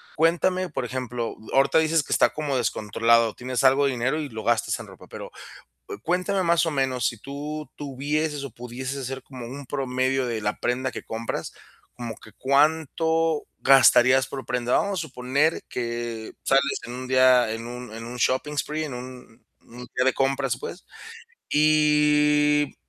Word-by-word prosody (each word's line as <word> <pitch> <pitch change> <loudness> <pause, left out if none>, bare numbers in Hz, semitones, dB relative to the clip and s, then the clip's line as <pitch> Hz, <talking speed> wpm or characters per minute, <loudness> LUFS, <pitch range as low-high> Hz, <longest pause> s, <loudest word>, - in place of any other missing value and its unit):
cuéntame, 175 +3 +2
por 130 - -3
ejemplo, 125 -2 -4 0.2
ahorita 135 +4 +4
dices 160 0 +3
que - - -3
está - - +4
como 150 -3 -2
descontrolado, 115 -1 +2
tienes 125 +1 -3
algo 135 +2 +5
de 140 - +2
dinero 130 +4 -1
y 150 -2 -4
lo 110 -2 -7
gastas 115 -2 +1
en - - -9
ropa, - - -14
pero, - - -9 0.6
eh, - - -4
cuéntame, 185 +3 0
más 170 0 +3
o 165 - -1
menos, 130 -4 0
si 115 - -3
tú 150 +5 -6
tuvieses 145 +2 -2
o 140 - -6
pudieses 125 +4 -6
hacer 135 0 -5
como 125 -3 -9
un 140 +3 -8
promedio 130 0 -1
de 115 -2 -2
la 105 0 -2
prenda 130 +2 -1
que - - -7
compras, 115 +1 -4 0.4
como 120 -2 -6
que 110 - -15
cuánto 160 - +1
gastarías 130 -1 +6
por 135 0 -7
prenda. 125 0 +1
Vamos 200 -2 -1
a - - -1
suponer 140 +1 0
que 120 -2 -4
sales 135 +1 +2
en 120 - -7
un 130 +1 -6
día, 130 -2 +5
en 115 +1 -5
un 125 -1 -8
en 115 +1 -7
un 120 +1 -7
shopping 130 +5 0
spree 155 +2 -2
en 145 - -6
un 125 -2 -10 0.2
un 125 +1 -12
día 125 - +2
de 130 - +3
compras, 135 -2 0
pues, 180 - -8 0.7
y 150 -1 +3
135 Hz, 175 wpm, -25 LUFS, 125-150 Hz, 0.7 s, gastarías